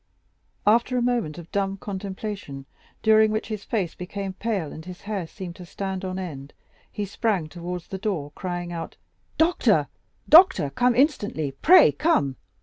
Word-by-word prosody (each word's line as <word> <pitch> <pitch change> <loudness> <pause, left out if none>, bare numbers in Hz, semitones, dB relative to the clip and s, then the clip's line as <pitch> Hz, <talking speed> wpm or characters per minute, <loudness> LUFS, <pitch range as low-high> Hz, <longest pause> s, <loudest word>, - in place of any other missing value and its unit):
After 235 +4 +3
a - - +1
moment 235 -11 0
of 170 -1 -11
dumb 195 -1 -1
contemplation, 195 -7 -6 0.4
during 220 0 +5
which 215 +1 -2
his 215 -2 -4
face 195 -7 -2
became 190 +1 -5
pale 195 -6 -3
and 160 - -9
his 180 +1 -10
hair 200 -5 -4
seemed 180 -1 -8
to 180 - -10
stand 190 +1 -4
on 185 0 -3
end, 145 -7 -7 0.4
he 205 - -3
sprang 200 -4 -1
towards 175 +1 -6
the 190 - -5
door, 180 -9 -2
crying 175 0 -4
out: 165 - -6 0.4
"Doctor, 330 +2 +3 0.4
doctor! 325 - +7
come 245 - +2
instantly, 210 - +1
pray 335 - +6
come!" 155 - +1
190 Hz, 155 wpm, -25 LUFS, 175-220 Hz, 0.4 s, doctor